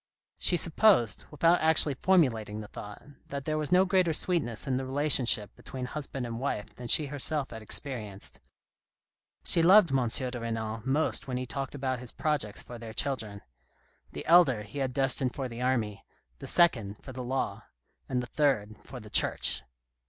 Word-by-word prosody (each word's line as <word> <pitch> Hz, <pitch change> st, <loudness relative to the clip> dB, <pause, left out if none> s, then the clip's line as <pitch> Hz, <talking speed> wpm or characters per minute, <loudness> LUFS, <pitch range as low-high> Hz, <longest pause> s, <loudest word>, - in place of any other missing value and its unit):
She 175 Hz, -, +2 dB
supposed, 165 Hz, -, +3 dB
without 165 Hz, +4 st, +2 dB
actually 160 Hz, -2 st, +4 dB
formulating 125 Hz, -, +1 dB
the 105 Hz, -, -9 dB
thought, 105 Hz, 0 st, -10 dB, 0.2 s
that 140 Hz, -1 st, -6 dB
there 155 Hz, 0 st, -1 dB
was 150 Hz, -2 st, -2 dB
no 185 Hz, +1 st, +5 dB
greater 185 Hz, -3 st, +2 dB
sweetness 150 Hz, -, -1 dB
in 130 Hz, -2 st, -1 dB
the 135 Hz, -, -3 dB
relationship 130 Hz, -6 st, +2 dB
between 130 Hz, -1 st, -7 dB
husband 135 Hz, -1 st, -5 dB
and 115 Hz, -1 st, -5 dB
wife 130 Hz, -6 st, -4 dB
than 120 Hz, -, -9 dB
she 150 Hz, +6 st, +5 dB
herself 145 Hz, 0 st, -2 dB
had 115 Hz, -, -8 dB
experienced. 110 Hz, -3 st, -4 dB, 1.0 s
She 170 Hz, -, +6 dB
loved 185 Hz, 0 st, +6 dB
M. 130 Hz, -3 st, +1 dB
de 125 Hz, +2 st, 0 dB
Renal 115 Hz, -1 st, -4 dB
most 145 Hz, +3 st, 0 dB
when 125 Hz, -1 st, -3 dB
he 130 Hz, -, -3 dB
talked 135 Hz, +2 st, -5 dB
about 130 Hz, -2 st, -2 dB
his 125 Hz, -1 st, -5 dB
projects 145 Hz, -10 st, -1 dB
for 120 Hz, -1 st, -10 dB
their 115 Hz, -1 st, -8 dB
children. 110 Hz, -7 st, 0 dB, 0.7 s
The -, -, -8 dB
elder 160 Hz, -10 st, +5 dB
he 105 Hz, +7 st, -8 dB
had 135 Hz, -2 st, -1 dB
destined 130 Hz, -1 st, +1 dB
for 135 Hz, -2 st, -3 dB
the 120 Hz, 0 st, -8 dB
army, 115 Hz, -6 st, -1 dB, 0.4 s
the -, -, -8 dB
second 115 Hz, -, +2 dB
for 130 Hz, -, -9 dB
the 130 Hz, 0 st, -6 dB
law, 130 Hz, +2 st, -3 dB, 0.4 s
and 125 Hz, -1 st, -1 dB
the -, -, -5 dB
third 120 Hz, -7 st, 0 dB
for 130 Hz, -, -10 dB
the 105 Hz, -2 st, -13 dB
Church. -, -, +2 dB
130 Hz, 175 wpm, -29 LUFS, 115-150 Hz, 1.0 s, She